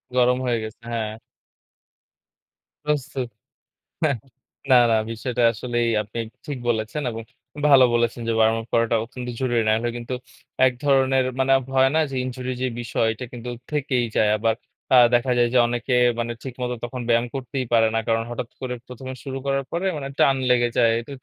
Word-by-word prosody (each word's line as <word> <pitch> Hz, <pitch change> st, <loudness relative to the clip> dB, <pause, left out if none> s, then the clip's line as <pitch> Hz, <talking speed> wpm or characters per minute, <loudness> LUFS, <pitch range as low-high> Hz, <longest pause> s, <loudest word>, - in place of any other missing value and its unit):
গরম 125 Hz, 0 st, +4 dB
হয়ে 120 Hz, -2 st, +1 dB
গেছে, 110 Hz, 0 st, -8 dB
হ্যাঁ। 110 Hz, -2 st, -2 dB, 1.7 s
প্রস্তুত। 135 Hz, -3 st, -1 dB, 0.8 s
হ্যাঁ। 145 Hz, -4 st, +2 dB, 0.5 s
না, -, -, +8 dB, 0.2 s
না 115 Hz, -, +4 dB, 0.2 s
বিষয়টা 120 Hz, +2 st, -2 dB
আসলেই 120 Hz, +1 st, -1 dB
আপনি 105 Hz, +2 st, -8 dB, 0.3 s
ঠিক 145 Hz, -3 st, -4 dB
বলেছেন 110 Hz, +5 st, -1 dB
এবং 115 Hz, 0 st, -6 dB, 0.5 s
ভালো 135 Hz, -3 st, +8 dB
বলেছেন 120 Hz, 0 st, 0 dB
যে -, -, +2 dB
ওয়ার্ম 110 Hz, 0 st, +4 dB
আপ 115 Hz, -, -9 dB
করাটা 115 Hz, 0 st, +2 dB
অত্যন্ত 125 Hz, +1 st, -8 dB
জরুরি 120 Hz, -3 st, +1 dB
না -, -, +5 dB
হলে 120 Hz, +1 st, -1 dB
কিন্তু 120 Hz, +1 st, -5 dB, 0.5 s
এক 130 Hz, -, +3 dB
ধরনের 135 Hz, -2 st, +3 dB
মানে 135 Hz, 0 st, +1 dB
আব 135 Hz, -, -7 dB
হয় 130 Hz, 0 st, +5 dB
না 160 Hz, -, +4 dB
যে 135 Hz, -, -4 dB
ইনজুরি 130 Hz, 0 st, -4 dB
যে 130 Hz, -, +1 dB
বিষয় 115 Hz, -1 st, 0 dB
এটা 110 Hz, +3 st, -7 dB
কিন্তু 120 Hz, 0 st, -6 dB, 0.2 s
থেকেই 130 Hz, -4 st, 0 dB
যায়। 105 Hz, -, +4 dB
আবার 110 Hz, +1 st, +2 dB, 0.4 s
আ -, -, +9 dB, 0.2 s
দেখা 125 Hz, +1 st, +2 dB
যায় 120 Hz, 0 st, +4 dB
যে -, -, +6 dB
অনেকে 120 Hz, +2 st, -1 dB, 0.3 s
মানে 120 Hz, 0 st, -2 dB
ঠিকমত 125 Hz, -1 st, -4 dB
তখন 125 Hz, +1 st, -5 dB
ব্যায়াম 115 Hz, 0 st, +3 dB
করতেই 130 Hz, -1 st, -3 dB
পারে 115 Hz, -1 st, +5 dB
না। -, -, +2 dB
কারণ 115 Hz, 0 st, +2 dB
হঠাৎ 120 Hz, 0 st, -4 dB
করে 125 Hz, -1 st, -3 dB
১ম 125 Hz, +1 st, -10 dB
এ -, -, -6 dB
শুরু 135 Hz, -1 st, -4 dB
করার 135 Hz, 0 st, 0 dB
পরে 175 Hz, +3 st, -1 dB
মানে 140 Hz, -2 st, -4 dB
টান 135 Hz, -, +4 dB
লেগে 120 Hz, -1 st, +4 dB
যায়। 115 Hz, -1 st, +5 dB
ত -, -, -30 dB
125 Hz, 185 wpm, -23 LUFS, 115-130 Hz, 1.7 s, আ